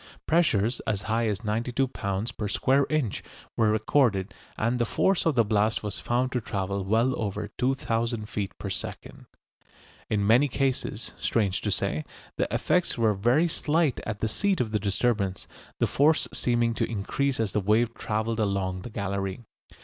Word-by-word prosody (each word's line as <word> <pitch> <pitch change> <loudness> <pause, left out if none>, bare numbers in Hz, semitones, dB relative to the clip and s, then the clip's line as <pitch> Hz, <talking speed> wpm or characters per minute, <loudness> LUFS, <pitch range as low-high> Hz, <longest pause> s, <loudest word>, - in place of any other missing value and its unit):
Pressures 130 - +2
as 100 -2 0
high 115 +1 0
as 105 0 -2
92 120 +5 0
lb. 100 -1 -3
per 105 - -3
square 135 +6 +2
inch 150 -10 0 0.3
were 110 -2 +3
recorded, 110 -2 +2 0.2
and 120 +3 0
the 120 - +2
force 190 +9 +1
of 160 - +2
the 115 -2 +4
blast 105 +1 +1
was 105 -2 -3
found 125 +2 0
to 125 - -1
travel 100 -2 -2
well 115 +6 +2
over 105 0 -3
2000 115 -4 0
feet 100 -3 -4
per - - -6
second. - - -6 0.8
In 105 -2 +1
many 120 +7 +5
cases, 130 -4 -1
strange 100 -5 +1
to - - -2
say, 75 - -1 0.3
the - - 0
effects 180 -6 +1
were 110 -2 +3
very 120 - +3
slight 155 -3 +1
at 105 -1 -5
the 110 - +1
seat 195 - 0
of 115 -4 -1
the 105 - +1
disturbance, 100 -1 0 0.3
the - - +2
force 150 +3 +3
seeming 120 -1 +1
to - - -1
increase 125 +6 -1
as 110 -3 0
the 105 - 0
wave 110 +4 +2
travelled 110 +1 -2
along 95 -3 -1
the 120 - -7
gallery. 100 0 -3
110 Hz, 170 wpm, -27 LUFS, 105-125 Hz, 0.8 s, many